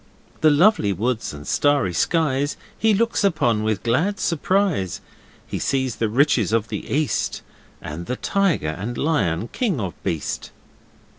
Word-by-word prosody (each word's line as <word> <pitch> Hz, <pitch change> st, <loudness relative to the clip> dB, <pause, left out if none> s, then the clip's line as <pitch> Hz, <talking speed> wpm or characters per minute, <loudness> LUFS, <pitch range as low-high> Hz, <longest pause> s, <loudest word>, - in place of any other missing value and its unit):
'The 155 Hz, -, +5 dB
lovely 150 Hz, -, +4 dB
woods 115 Hz, +5 st, -1 dB
and 75 Hz, 0 st, -9 dB
starry 145 Hz, -11 st, +2 dB
skies 145 Hz, -, +1 dB, 0.2 s
He 220 Hz, 0 st, +2 dB
looks 230 Hz, +1 st, +1 dB
upon 120 Hz, -, +2 dB
with 110 Hz, -2 st, -1 dB
glad 175 Hz, -, +1 dB
surprise! 175 Hz, -, 0 dB, 0.5 s
He -, -, -4 dB
sees 130 Hz, -4 st, -1 dB
the 115 Hz, -, 0 dB
riches 120 Hz, -, +2 dB
of 115 Hz, -1 st, +1 dB
the 105 Hz, -, -5 dB
east, 145 Hz, -5 st, 0 dB, 0.4 s
And 85 Hz, +3 st, -6 dB
the 125 Hz, -, -1 dB
tiger 195 Hz, -, 0 dB
and 105 Hz, +10 st, -4 dB
lion, 110 Hz, -, 0 dB
kings 205 Hz, -, -1 dB
of 95 Hz, -6 st, -3 dB
beast. 80 Hz, -3 st, -3 dB
130 Hz, 145 wpm, -22 LUFS, 105-165 Hz, 0.5 s, The